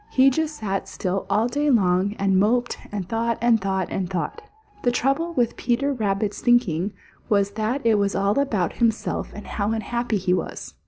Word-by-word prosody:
He 270 +1 +5
just 310 +2 -1
sat 195 -7 -3
still 190 0 -3
all 210 +4 +2
day 290 +4 0
long 195 -4 +2
and 195 -1 +2
moped 240 +4 +2 0.2
and 200 -4 -4
thought 230 +2 0
and 230 -2 +3
thought 190 -1 -1
and 185 -2 -2
thought. 185 - -3 0.4
The 245 - +2
trouble 275 +8 0
with 240 -4 +1
Peter 265 +4 0
Rabbit's 205 -3 -1
thinking 205 -6 +2 0.4
was 200 -1 +2
that 220 +5 -2
it 220 -2 +4
was 200 0 0
all 200 +6 +2
about 210 -11 0
himself 230 -2 0
and 210 - -9
how 210 +1 -1
unhappy 235 0 -1
he 185 -1 +1
was. 185 - -4
215 Hz, 180 wpm, -23 LUFS, 195-245 Hz, 0.4 s, He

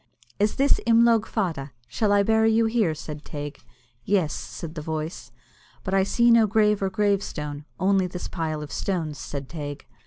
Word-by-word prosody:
"Is 210 +1 +2
this 280 +1 +3
Imlogue 230 -1 +5
Fada? 160 - -2
Shall 205 - 0
I 200 0 +4
bury 220 +1 +3
you 225 +1 +3
here?" 220 -8 +1
said 150 0 -8
Teig. 145 -1 -7 0.4
"Yes," 185 -4 +1
said 160 -2 -7
the 160 - -5
voice. 155 -5 -5 0.5
"But 190 - -3
I 195 - +4
see 235 +5 +3
no 230 -2 +6
grave 210 -1 +2
or 195 - +1
gravestone, 185 -8 -1
only 190 0 +2
this 180 0 -6
pile 155 -3 -3
of 145 - -9
stones," 165 -7 -2
said 140 -2 -6
Teig. 145 -2 -6
190 Hz, 175 wpm, -25 LUFS, 155-215 Hz, 0.5 s, no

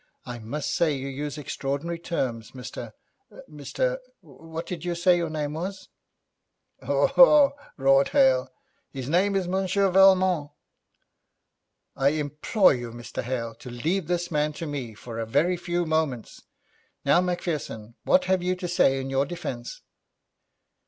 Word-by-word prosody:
'I 120 -1 -6
must 130 +7 -4
say 160 -4 +2
you 135 0 -5
use 145 +2 -5
extraordinary 145 +4 -3
terms, 125 -10 -3
Mr 125 -3 -8 0.5
Mr - - -2 0.2
What 165 0 -9
did 175 -2 -6
you 175 -1 -2
say 175 0 +3
the 165 - -2
name 150 -1 -3
was?' 190 +5 -6 0.9
'Haw - - +2
haw,' 300 - +7 0.3
roared 135 0 +4
Hale. 130 -1 +3 0.4
'His 130 -2 -6
name 185 +6 +2
is 190 -2 0
Monsieur 190 +1 +1
Valmont.' 185 -5 +5 1.5
'I 135 - +2
implore 150 +7 +2
you, 120 -2 -5
Mr. 120 0 -6
Hale, 115 -2 -3
to 125 - -9
leave 160 +9 -2
this 175 0 -1
man 150 0 0
to 165 - -6
me 135 -7 -5
for 115 +1 -8
a 115 - -3
very 175 +10 +2
few 175 0 -2
moments. 155 -7 -2 0.6
Now, 175 - +5
Macpherson, 160 -11 -3
what 275 0 +3
have 190 -1 +2
you 180 +1 0
to 180 -1 -5
say 135 -6 +3
in 135 0 -5
your 135 +1 +1
defence?' 125 -8 -6
155 Hz, 145 wpm, -26 LUFS, 135-180 Hz, 1.5 s, haw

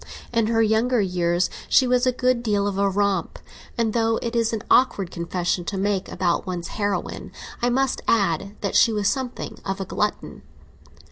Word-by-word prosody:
In 230 -2 +2
her 225 0 +2
younger 225 +3 +2
years 180 -2 +1 0.2
she 260 - +5
was 250 0 +2
a - - +4
good 250 -1 +1
deal 205 -4 0
of 200 -1 -2
a 200 0 +3
romp, 200 0 0 0.4
and, 225 -2 +1
though 225 -1 +2
it 235 0 -3
is 230 -1 +2
an 225 -1 -3
awkward 205 -8 +3
confession 175 +1 -2
to 195 - -3
make 195 -1 -1
about 175 -1 0
one's 175 -2 -4
heroine, 205 -2 -3 0.3
I 240 - +2
must 265 +1 0
add 195 -2 +1
that 200 - -2
she 230 - +6
was 210 -2 0
something 250 +4 -3
of 195 0 -3
a 195 - -3
glutton. - - -3
205 Hz, 185 wpm, -23 LUFS, 190-235 Hz, 0.4 s, she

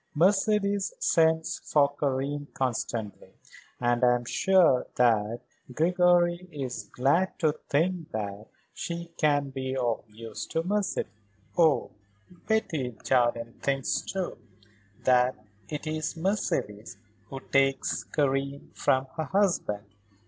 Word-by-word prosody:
"Mercedes 200 +3 +2
sends 160 0 +2
for 145 -1 +2
Karen 145 +1 -2
constantly. 115 -4 -3 0.4
And 120 0 +1
I 125 0 +6
am 120 0 -4
sure 175 -3 +3
that 115 -1 +2 0.3
Gregory 175 +3 +3
is 135 -5 -5
glad 155 +9 +1
to 155 -3 +2 0.2
think 165 +2 0
that 105 0 -5 0.3
she 170 0 -5
can 145 -3 +2
be 130 0 -3
of 120 -3 0
use 110 0 -7
to 165 - -1
Mercedes." 200 - -1 0.4
"Oh, 160 -4 +3 0.6
Betty 155 - -1
Jardine 120 -2 +1
thinks, 135 -1 0
too, 190 -2 -4 0.6
that 125 0 +4 0.3
it 150 +1 -5
is 155 +1 -3
Mercedes 110 - -2 0.3
who 135 +4 -7
takes 135 0 +1
Karen 140 -1 -1
from 130 0 +1
her 160 - -1
husband. 170 - 0
140 Hz, 110 wpm, -28 LUFS, 125-170 Hz, 0.6 s, I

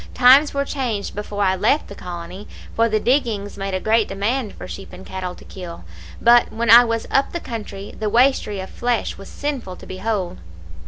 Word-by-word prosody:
Times 265 +4 +7
were 280 0 -1
changed 245 -8 -3
before 205 0 -3
I 190 -1 +3
left 220 +10 +2
the - - -10
colony, 180 +2 -8 0.3
for 230 0 +3
the 215 0 +1
diggings 230 -6 0
made 195 -1 -3
a - - 0
great 220 +2 +2
demand 210 +4 -2
for - - -9
sheep 195 - -8
and 190 - -11
cattle 185 -1 -5
to - - -15
kill; 175 - -9 0.4
but 240 0 +5
when 235 +1 +1
I 235 +1 +10
was 230 -1 -2
up 275 0 +2
the 345 - -2
country 210 -7 -7
the 215 -1 -1
waistrie 230 -4 +2
of 190 - -10
flesh 240 -4 -1
was 195 - -10
sinful 270 -11 -4
to - - -13
behold. 190 - -3
215 Hz, 200 wpm, -21 LUFS, 195-245 Hz, 0.4 s, I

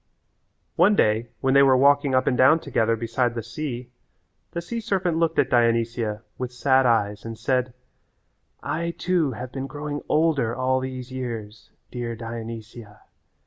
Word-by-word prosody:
One 195 +5 +5
day 110 - +2
when 130 -1 +2
they 140 - +7
were 135 -2 +5
walking 140 0 +4
up 130 - +3
and 130 - +2
down 135 +6 +5
together 115 -6 0
beside 115 +1 -1
the 115 - -3
sea 125 0 -6 0.6
the 170 - -4
sea 230 +7 -4
serpent 185 -6 -1
looked 165 -1 +1
at - - +3
Dionysia 115 -2 +1 0.2
with 125 -1 -3
sad 130 +1 +3
eyes 105 -3 +1
and 115 -1 -7
said, 125 +1 -1 0.9
"I 170 +1 -2
too 170 -7 +1
have 125 +2 -7
been 135 +1 -5
growing 145 0 -5
older 150 -8 +2
all 130 0 +1
these 130 -1 -6
years, 115 -4 -6 0.2
dear 120 -2 -4
Dionysia. 115 -1 -8
125 Hz, 155 wpm, -24 LUFS, 115-140 Hz, 0.9 s, they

